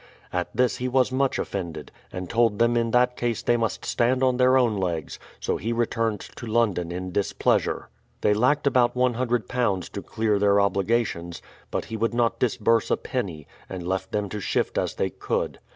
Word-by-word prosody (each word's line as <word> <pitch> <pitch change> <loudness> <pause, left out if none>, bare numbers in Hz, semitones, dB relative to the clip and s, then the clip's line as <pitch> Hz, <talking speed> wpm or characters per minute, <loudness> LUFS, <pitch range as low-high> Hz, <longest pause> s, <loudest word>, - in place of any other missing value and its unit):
At 90 -1 -1
this 125 -1 +2
he 125 - -2
was 130 0 +2
much 135 +1 +1
offended, 85 -6 -4 0.2
and 90 0 -5
told 115 0 +2
them 120 +1 +3
in 115 -1 +1
that 125 +1 +3
case 120 -3 -2
they 120 - +3
must 115 -2 -2
stand 125 +2 +1
on 130 -1 +3
their 130 +1 +5
own 120 -4 +3
legs; 85 -5 -3 0.2
so - - -1
he 115 - -3
returned 115 -2 0 0.2
to 120 - -7
London 105 -7 +1
in 90 +1 -4
displeasure. 100 +2 0 0.3
They 105 - +4
lacked 130 +8 +2
about 125 -3 +3
iioo 120 -5 0
to - - -5
clear 110 -2 0
their 100 0 +4
obligations; 100 -3 0 0.3
but - - -2
he 110 - -5
would 115 +2 0
not 120 -1 +1
dis 125 -2 +1
burse 115 0 +2
a - - +2
penny, 90 - -4 0.2
and 90 -2 -6
left 95 0 -2
them 105 -1 -1
to 105 - -4
shift - - 0
as - - -2
they - - -1
could. - - -2
115 Hz, 190 wpm, -25 LUFS, 95-125 Hz, 0.3 s, their